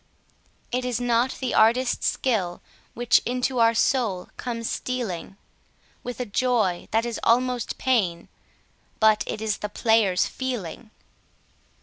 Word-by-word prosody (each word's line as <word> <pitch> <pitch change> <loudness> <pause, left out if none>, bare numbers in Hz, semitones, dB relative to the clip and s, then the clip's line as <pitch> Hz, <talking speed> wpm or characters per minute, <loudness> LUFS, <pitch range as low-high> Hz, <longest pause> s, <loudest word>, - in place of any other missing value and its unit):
It 250 +1 -1
is 250 -2 -1
not 245 +1 +1
the 260 -2 -2
artist's 240 +3 +3
skill 195 -9 -1 0.3
which 240 +1 +3
into 250 +1 -1
our 230 0 +4
soul 225 -7 +1
comes 230 -2 -4
stealing 205 -7 -4 0.6
With 245 -1 -6
a 250 - -2
joy 215 -5 0
that 225 +2 +1
is 235 -1 -3
almost 245 0 +1
pain, 200 -10 0 0.7
but 215 -1 +4
it 215 - -4
is 215 -2 0
the 210 - -4
player's 215 -4 +2
feeling. 240 -5 -5
230 Hz, 125 wpm, -25 LUFS, 210-250 Hz, 0.7 s, our